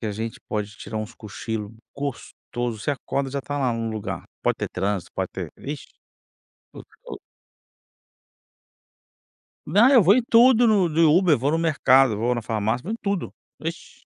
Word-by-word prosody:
que 110 - -4
a 105 - -2
gente 110 +2 -5
pode 105 -1 -3
tirar 110 - -7
uns 110 +2 -6
cochilo 110 0 -6 0.2
gostoso, 120 -4 -5
você 145 - -1
acorda, 140 0 -3
já 140 +1 -3
tá 145 +1 -4
lá 130 -3 +1
no 115 0 -3
lugar. 110 -2 -5 0.2
Pode - - +1
ter - - -3
trânsito, 95 -1 -3
pode - - -2
ter - - -6
ixe. 145 +2 -6 0.9
O - - -9 0.2
o - - -7 2.5
Não, 225 +5 +5
eu 255 -5 +7
vou 195 +5 +6
em 255 - +2
tudo 240 +1 +6
no 205 -5 +3
de 160 - +1
Uber, 165 -1 +5
vou 140 +5 0
no 165 - +1
mercado, 135 -7 +4
vou 120 +3 0
na 120 - -3
farmácia, 110 +2 -1
vou 190 - -6
em 225 - -2
tudo. 200 -3 -2 0.3
Ixe, 165 +2 -7
135 Hz, 175 wpm, -24 LUFS, 110-165 Hz, 2.5 s, eu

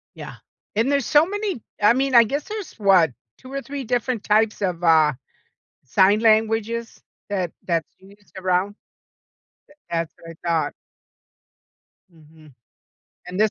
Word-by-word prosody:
Yeah, - - -9 0.4
and 230 +5 +2
there's 280 -3 +1
so 300 +1 +5
many 405 - -3 0.2
I 210 +2 +6
mean, 265 +1 0
I 235 - +9
guess 280 +6 -3
there's, 425 -4 -6
what, 190 -7 +4 0.3
2 255 - -13
or 275 0 -3
3 280 0 -6
different 245 -1 -1
types 215 0 +2
of, 180 -3 -2
uh, 160 -3 +5 0.7
sign 190 +9 +4
languages 225 +1 +1 0.3
that 185 -4 -1 0.2
that's 165 -3 0
used 195 -2 -20
around. 185 +2 0 0.9
Th 295 - -21
that's 165 -1 -2
what 165 -1 -11
I - - -3
thought. 160 -3 0 1.4
Mhm, 155 -2 -19 0.7
and 180 +2 -4
this 215 0 +4
210 Hz, 140 wpm, -22 LUFS, 170-245 Hz, 1.4 s, I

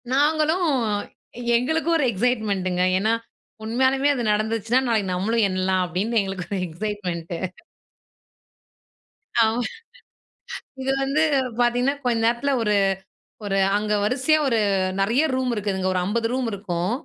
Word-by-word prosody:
நாங்களும் 310 +5 +2 0.9
எங்களுக்கும் 320 +7 0
ஒரு 295 - +1
எக்ஸைட்மெண்டங்க 200 -5 0 0.2
ஏன்னா, 220 +3 +1 0.5
உண்மையாலயுமே 260 +5 +2
அது 250 -4 -2
நடந்துச்சுனா 220 +3 +1
நாளைக்கு 215 -5 0
நம்மளும் 215 +5 +1
எண்ணலாம், 185 0 0
அப்டின்னு 200 +7 0
எங்களுக்கு 195 -2 -5
ஒரு - - -2
எக்ஸைட்மெண்ட்டு. 175 -2 -4 2.1
ஆமா. 225 +2 +1 1.2
இது 265 - -1
வந்து 275 +3 +1 0.4
பார்த்தீங்கன்னா, 245 +3 +2
கொஞ்ச 240 -2 +1
நேரத்ல 240 +4 +1
ஒரு 210 -2 +1 0.7
ஒரு 195 -1 0 0.2
அங்க 210 0 0
வரிசையா 260 +8 +2
ஒரு 235 -4 +2 0.4
நெறைய 230 +9 +2
ரூம் 260 -1 0
இருக்குதுங்க. 195 -3 -2
ஒரு 185 - 0
50 225 +4 0
ரூம் 255 -1 -1
இருக்கும். 185 -2 -2
225 Hz, 115 wpm, -23 LUFS, 195-255 Hz, 2.1 s, நாங்களும்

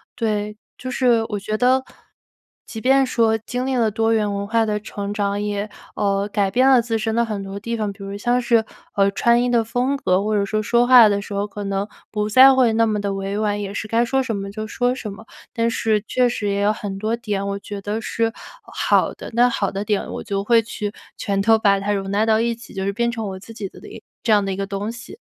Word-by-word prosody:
对， 210 -2 -2 0.2
就 255 - -6
是 240 -3 +3
我 210 -2 -2
觉 215 +2 -3
得 255 +2 +3 0.8
即 220 -2 -8
便 270 +1 +4
说 225 -3 +2
经 245 +3 -4
历 265 0 -1
了 230 -2 +2
多 225 +2 0
元 210 -2 +1
文 200 0 -3
化 225 +1 +1
的 210 -1 -1
成 205 -1 -5
长， 205 0 -1
也 205 0 -3 0.3
呃， 200 -1 0
改 200 -2 +1
变 255 +6 +3
了 255 -3 +6
自 225 -1 -1
身 220 0 -2
的 235 - +3
很 215 -3 -3
多 195 0 -6
地 230 +3 -4
方， 210 -2 -2
比 195 0 -12
如 195 +1 -6
像 240 +4 +1
是， 230 -2 +2 0.3
呃， 200 0 +4
穿 235 +3 +3
衣 245 - +1
的 235 -2 +3
风 245 +5 -1
格， 185 -7 +1
或 215 0 0
者 200 - +2
说 215 +1 -1
说 240 +3 +2
话 245 -3 +8
的 200 -1 0
时 200 - -8
候， 200 +1 -1
可 205 0 -7
能 195 +1 -2 0.2
不 210 -1 -1
再 260 +5 +8
会 250 -4 +3
那 230 0 +3
么 210 -1 0
地 200 -1 -2
委 195 +1 -3
婉， 205 -1 0
也 200 0 -5
是 215 - -4
该 230 +2 +2
说 265 +3 +1
什 230 -5 -2
么 195 0 -5
就 215 +1 -5
说 245 +2 0
什 240 -4 -6
么。 220 +3 -13 0.3
但 230 0 +1
是 220 -2 0
确 250 +2 +2
实 210 -4 -2
也 200 0 0
有 210 +1 +3
很 200 -2 -6
多 220 +2 0
点， 205 -4 -3
我 200 0 -2
觉 200 0 -7
得 210 +3 -3
是 225 +1 -1 0.3
好 - - +1
的。 - - -9
那 245 +1 +4
好 200 -4 -1
的 200 +2 -4
点 210 -2 -1
我 - - -5
就 200 -2 -2
会 230 +2 +4
去 210 -1 -5 0.2
全 200 -2 -1
都 225 +2 +5
把 200 -2 +3
它 205 +1 -1
容 195 -1 -3
纳 210 +2 +2
到 220 0 +3
一 235 0 +1
起， 230 - -14
就 190 -1 -3
是 200 - 0
变 235 +3 0
成 225 -2 -4
我 190 -1 -7
自 225 +4 -12
己 205 -4 -6
的 - - -15
一 - - -11 0.2
这 220 - +2
样 205 - +4
的 195 - -2
一 190 - -4
个 195 - -3
东 200 +2 -3
西。 240 - -11
215 Hz, 275 characters per minute, -21 LUFS, 200-235 Hz, 0.8 s, 话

